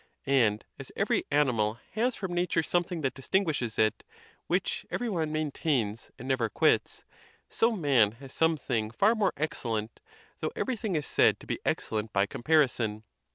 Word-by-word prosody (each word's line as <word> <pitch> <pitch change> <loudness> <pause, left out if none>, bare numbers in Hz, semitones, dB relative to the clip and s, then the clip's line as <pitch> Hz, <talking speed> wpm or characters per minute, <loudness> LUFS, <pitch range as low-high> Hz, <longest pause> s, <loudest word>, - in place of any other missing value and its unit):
And 120 -7 +2
as - - -8
every - - +1
ani 145 -2 +3
mal 110 0 0
has 235 +4 0
from 190 -3 -4
nature 175 -2 +1
something 175 0 -1
that 135 -3 0
distinguishes 140 - -1
it, 110 0 +2 0.4
which - - 0
every 245 - -2
one 160 -5 -1
maintains 140 -8 -1
and 130 - -8
never 130 -4 +1
quits; - - +1 0.5
so 230 +1 +2
man 135 - +3
has 135 +3 -11
some 160 0 +2
thing 115 -6 -1
far 200 - +3
more 210 -5 +1
excellent, 115 -8 -3 0.4
though - - -3
everything 225 -7 -2
is 150 -2 -1
said - - +3
to - - -13
be - - -3
excellent 110 0 -1
by 100 0 +3
comparison. 120 -4 +1
140 Hz, 160 wpm, -29 LUFS, 115-175 Hz, 0.5 s, ani